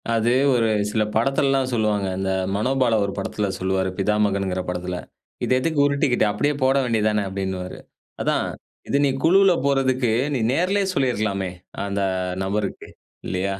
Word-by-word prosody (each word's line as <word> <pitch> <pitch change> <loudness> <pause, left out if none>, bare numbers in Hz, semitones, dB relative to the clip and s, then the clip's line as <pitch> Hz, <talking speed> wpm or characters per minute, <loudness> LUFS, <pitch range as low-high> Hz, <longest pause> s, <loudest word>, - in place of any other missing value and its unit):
அது 115 +1 +2 0.2
ஒரு 115 -2 +2 0.2
சில 110 0 +1
படத்துலல்லாம் 135 +2 +2
சொல்லுவாங்க. 105 -3 +1
அந்த 95 0 -2 0.3
மனோபாலா 125 +1 +2
ஒரு 100 - -4
படத்துல 100 +1 -2
சொல்லுவாரு 95 0 0
பிதாமகன்ங்கிற 100 -2 +1
படத்துல. 90 0 -3 0.5
"இது - - +1
எதுக்கு 160 +2 -1
உருட்டிக்கிட்டு? 140 -5 +2
அப்படியே 145 +8 0
போட 130 +1 +3
வேண்டியது 110 -3 +1
தான!" 105 - +1
அப்டின்னுவாரு. 95 -1 -4 0.4
அதான் - - +1 0.4
இது 140 - +2
நீ - - +2
குழுவுல 190 +2 +5
போறதுக்கு 130 -3 +2 0.2
நீ - - 0
நேர்லயே 190 +6 +1
சொல்லிருக்கலாமே! 105 - 0 0.3
அந்த 100 0 -2 0.4
நபருக்கு. 100 +2 -3 0.4
இல்லையா? 95 +1 -2
110 Hz, 135 wpm, -22 LUFS, 100-135 Hz, 0.5 s, குழுவுல